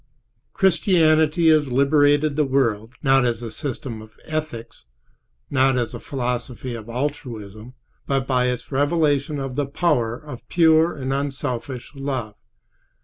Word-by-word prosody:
Christianity 165 -4 +3
has 155 -2 +4
liberated 145 +3 +3
the 155 - +2
world, 125 -4 0
not 135 -1 +4
as 120 -1 -1
a 115 - -5
system 130 -5 -5
of 110 0 -15
ethics, 150 - -5 0.6
not 130 -1 +3
as 120 -2 -2
a - - -6
philosophy 125 -1 -4
of 115 -1 -8
altruism, 120 -4 -5 0.3
but 135 -1 0
by 125 -2 +1
its 125 +2 -4
revelation 145 0 +1
of 135 -2 -4
the 140 +1 -1
power 140 -7 0
of 130 -6 -11
pure 165 0 +4
and 135 -1 -2
unselfish 135 -2 -4
love. 135 -6 -4
135 Hz, 135 wpm, -22 LUFS, 120-150 Hz, 0.6 s, has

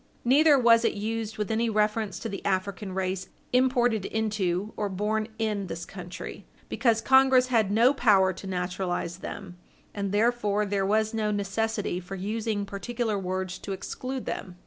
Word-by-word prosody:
Neither 290 +4 +6
was 235 -2 +5
it - - +1
used 220 +1 -3
with 210 0 -2
any 230 +1 +1
reference 215 -1 0
to - - -3
the 200 -2 -6
African 195 0 -2
race 185 0 -2 0.2
imported 245 -5 +2
into 210 -2 -1
or 205 -1 -2
born 210 +3 -1
in 210 -3 -1
this 170 -1 -5
country; 180 -2 -8 0.2
because 230 -3 +2
Congress 265 -1 +5
had 225 -5 +3
no 230 +6 +4
power 200 -8 +4
to 190 +2 -9
naturalize 180 -1 -2
them, 190 -1 -8 0.4
and 200 -2 -3
therefore 210 -1 +1
there 195 -1 0
was 215 +2 +1
no 215 -1 0
necessity 205 -1 -1
for 185 +2 -7
using 210 +1 -2
particular 220 +1 -2
words 185 -1 -3
to 195 - -5
exclude 255 +6 -5
them. 180 -2 -5
210 Hz, 160 wpm, -27 LUFS, 190-225 Hz, 0.4 s, Neither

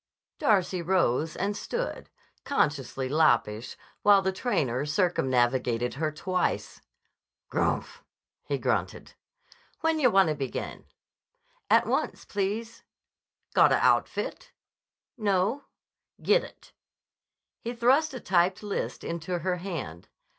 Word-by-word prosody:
Darcy 195 - +2
rose 165 -4 +1
and 200 +2 -1
stood, 485 - -4 0.3
consciously 140 - 0
loppish, 120 -7 +1 0.2
while 200 -1 +6
the 190 - +1
trainer 145 - -1
circumnavigated 130 - +1
her 155 +3 -1
twice. 180 +4 -2 0.7
"Grmph!" - - -1 0.4
he - - -2
grunted. - - -2 0.7
"When 325 -1 +1
yah 260 -4 +5
wanna 195 -7 +4
begin?" 135 -4 -5 0.8
"At - - +5
once, - - -2
please." 210 +3 -3 0.7
"Gotta - - +5
outfit?" - - 0 0.7
"No." 205 +5 +1 0.5
"Gittit." 480 +3 0 0.9
He 235 +1 -5
thrust 265 +5 +3
a - - -5
typed 185 0 +1
list 205 -1 -3
into 170 +1 -3
her 180 +2 -1
hand. 165 - -6
185 Hz, 100 wpm, -27 LUFS, 145-215 Hz, 0.9 s, while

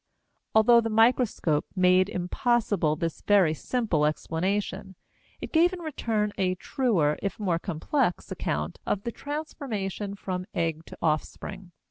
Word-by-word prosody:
Although 235 +2 +7
the 225 - -2
microscope 225 - +2
made 185 +1 +4
impossible 185 -3 +1
this 165 +1 -3
very 195 -6 +4
simple 170 -6 0
explanation, 190 +5 -2 0.5
it - - -6
gave 345 +3 +4
in 365 - -5
return 225 -10 -1
a 185 -1 +1
truer, 185 - +1
if 200 0 -3
more 180 -5 0
complex, 180 - -1
account 75 +1 -3
of 200 - -1
the 235 - -3
transformation 225 - -4
from 185 -2 -4
egg 165 -1 -1
to - - -11
offspring. 175 +4 -2
195 Hz, 130 wpm, -27 LUFS, 170-230 Hz, 0.5 s, Although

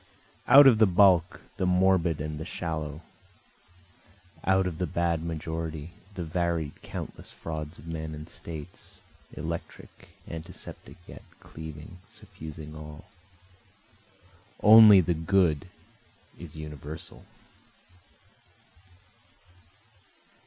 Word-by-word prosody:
Out 140 +1 +9
of 120 -5 +6
the 110 - +6
bulk, 90 -2 +4 0.2
the 95 - 0
morbid 90 -3 +2
and 75 0 -5
the - - -4
shallow, 80 -2 -5 1.4
Out 95 0 +3
of 85 -3 -4
the 90 - -1
bad 85 +1 -1
majority, 80 -1 -5 0.2
the 90 - -4
varied 85 -2 -2
countless - - -8
frauds 80 0 -7
of 75 - -14
men 80 -1 -5
and 75 +1 -9
states, 80 -4 -10 0.3
Electric, 85 +1 -7 0.2
antiseptic 80 0 -9
yet, - - -11 0.2
cleaving, 80 +2 -10
suffusing 80 -8 -11
all, 75 0 -10 1.6
Only 105 -2 +9
the 85 0 0
good 80 -1 +1 0.7
is - - -10
universal. 75 0 -9
80 Hz, 95 wpm, -27 LUFS, 75-90 Hz, 1.6 s, Out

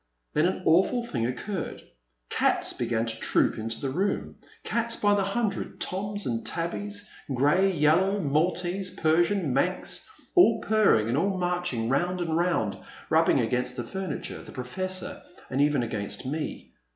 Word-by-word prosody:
Then 155 +3 +3
an 185 - -2
awful 190 +9 +3
thing 120 - -1
occurred. 165 +8 -4 0.5
Cats - - +2
began 115 -1 -1
to 115 -1 -3
troop - - +2
into 115 +1 -4
the 135 - -2
room, 195 +8 -1 0.3
cats 235 0 0
by 205 0 +3
the 200 -1 +2
hundred, 195 0 -2
toms 205 +2 -2
and 115 -2 -1
tabbys, 205 +5 -4 0.3
grey, 175 +10 +4
yel 155 -2 +4
low, 195 +2 +1
Maltese, 180 +4 0
Persian, 170 -1 +2
Manx, 180 +7 -1 0.2
all 230 -12 +6
purring 210 - +3
and 125 +5 +1
all 195 +2 +1
marching 175 -10 -1
round 175 +8 +1
and 165 -2 -1
round, 135 - +1 0.3
rubbing - - +4
against 125 0 -1
the 125 - -3
furniture, 190 -2 -5
the - - -12
Professor, 185 +9 -4 0.3
and 130 +2 +1
even 145 -3 +3
against 110 +1 -4
me. 150 +4 -4
175 Hz, 150 wpm, -27 LUFS, 130-195 Hz, 0.5 s, all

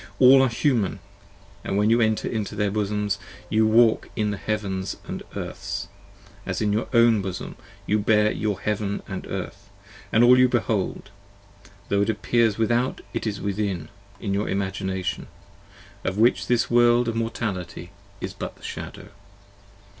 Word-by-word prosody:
All 130 +1 +8
are 135 - +3
Human, 115 - +1 0.4
& - - -26
when 105 +3 +1
you 120 +1 +4
enter 110 -1 +1
into 105 -3 -3
their 105 -1 0
Bosoms 105 -1 -1 0.3
you 110 0 +4
walk 115 0 +4
In 105 -1 0
Heavens 100 -2 -3 0.2
& - - -11
Earths; - - -5 0.5
as - - -3
in 105 -2 +1
your 110 - 0
own 115 -3 +5
Bosom 95 -2 -5 0.3
you 105 +1 +2
bear 105 0 +3
your 105 -3 -2
Heaven 105 -1 -2
And 95 -2 -6
Earth, 100 +1 -6 0.2
& - - -20
all 120 +3 +7
you 125 0 +6
behold: 110 -4 -1 0.8
tho' 100 0 +2
it 100 - +1
appears 110 0 +1
Without 120 +3 +1
it 115 -1 -2
is 105 -2 -3
Within 100 -4 -2 0.3
In 100 -3 -2
your 100 +2 -1
Imagination, 95 -3 -2 0.8
of 95 +1 -2
which 115 +3 +3
this 120 -1 +1
World 120 0 +5
of 115 - -1
Mortality 100 -6 -4 0.3
is - - -4
but - - -7
a - - -20
Shadow. - - -7
105 Hz, 155 wpm, -24 LUFS, 100-115 Hz, 0.8 s, All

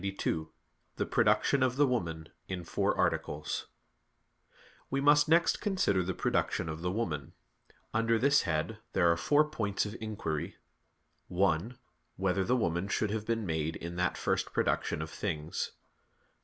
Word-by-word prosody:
_______________________ - - -13
QUESTION 100 0 -1
92 80 0 -10 0.5
THE - - -1
PRODUCTION 140 - +3
OF 130 -1 +2
THE 145 +2 +5
WOMAN 85 - -2 0.2
(In 90 -2 -4
Four - - 0
Articles) 75 +1 -1 1.2
We 135 - 0
must 145 +1 +5
next 170 +1 +4
consider 185 - +2
the 90 0 -2
production 90 - 0
of 80 +1 -5
the 90 - -1
woman. 90 -8 -3 0.6
Under 115 +1 +2
this 140 +4 +4
head 85 +6 -2
there 85 -2 +4
are - - +3
four 145 - +3
points 110 -11 -1
of 105 +2 -5
inquiry: 100 -9 -3 0.7
(1) 95 +6 +1 0.4
Whether 95 0 +1
the 125 +6 +2
woman 85 -3 0
should 105 +1 0
have 110 0 -3
been 115 -2 0
made 80 -1 -1
in 85 +2 -6
that 90 0 0
first - - 0
production 80 - 0
of 80 - -8
things? 80 -4 -3
95 Hz, 155 wpm, -31 LUFS, 85-115 Hz, 1.2 s, THE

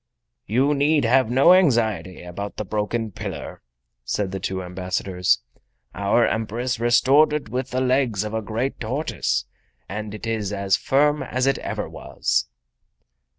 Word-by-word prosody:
"You 130 +7 +2
need 145 -1 +2
have 130 0 +3
no 135 +8 +6
anxiety 115 - +2
about 100 +4 -6
the 105 - -3
broken 110 +2 -2
pillar," - - -7 0.4
said 95 +10 -2
the 95 - -4
two 95 0 -3
ambassadors. 90 0 -1 0.5
"Our 100 +4 +2
Empress 115 +3 -2
restored 130 +6 +4
it 150 -7 -3
with 130 +3 -3
the 130 +1 -1
legs 125 -6 +1
of 105 0 -5
a 110 - -1
great 115 +6 -3
tortoise, 110 - -1 0.4
and 105 +2 -5
it 105 - -8
is 110 -3 -2
as 100 -1 +1
firm 145 +2 +2
as 130 +1 -1
ever 135 - -1
it - - -12
was." - - -1
115 Hz, 150 wpm, -23 LUFS, 100-130 Hz, 0.5 s, no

